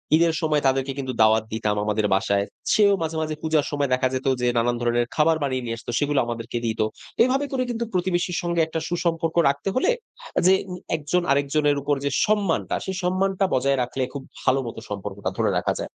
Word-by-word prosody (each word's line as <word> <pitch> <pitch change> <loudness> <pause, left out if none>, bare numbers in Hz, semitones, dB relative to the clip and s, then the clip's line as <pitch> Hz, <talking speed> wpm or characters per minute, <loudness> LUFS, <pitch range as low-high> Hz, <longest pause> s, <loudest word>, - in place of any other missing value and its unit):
ঈদের 165 0 +3
সময় 150 -2 +1
তাদেরকে 135 +1 +1
কিন্তু 130 -1 -3
দাওয়াত 110 0 +5
দিতাম 105 -2 0
আমাদের 105 0 0
বাসায়। 100 +1 +1 0.3
সেও 205 -2 +5
মাঝে, 160 0 -2
মাঝে 155 -1 -2
পূজার 155 -2 +1
সময় 145 -2 0
দেখা 130 0 +2
যেত 130 +1 -2
যে, 125 - +2
নানান 120 +1 +2
ধরনের 120 0 +1
খাবার 160 +1 +3
বানিয়ে, 130 -2 -1
নিয়ে 115 - -2
আসতো 120 - -7
সেগুলা 145 -1 +1
আমাদেরকে 120 0 -4
দিত। 110 -1 -2 0.4
এভাবে 265 +3 +1
করে 255 -1 0
কিন্তু 235 0 -2
প্রতিবেশীর 180 -1 0
সঙ্গে 170 -1 0
একটা 160 0 -2
সুসম্পর্ক 170 -1 -1
রাখতে 145 +7 -2
হলে 260 - +3 0.5
আ - - +5
উম - - 0
যে, 190 - +7 0.4
একজন 155 +4 0
আরেকজনের 145 +1 +2
উপর 145 +1 +1
যে, - - +2 0.2
সম্মানটা 210 -5 0
সেই 190 - -3
সম্মানটা 190 +2 +1
বজায় 135 +1 +2
রাখলে 130 +2 -3
খুব 140 -1 -6 0.2
ভালো 135 +1 +2
মতো 115 - -6
সম্পর্কটা 100 0 -4
ধরে - - +2
রাখা - - 0
যায়। - - -2
145 Hz, 200 wpm, -24 LUFS, 125-175 Hz, 0.5 s, যে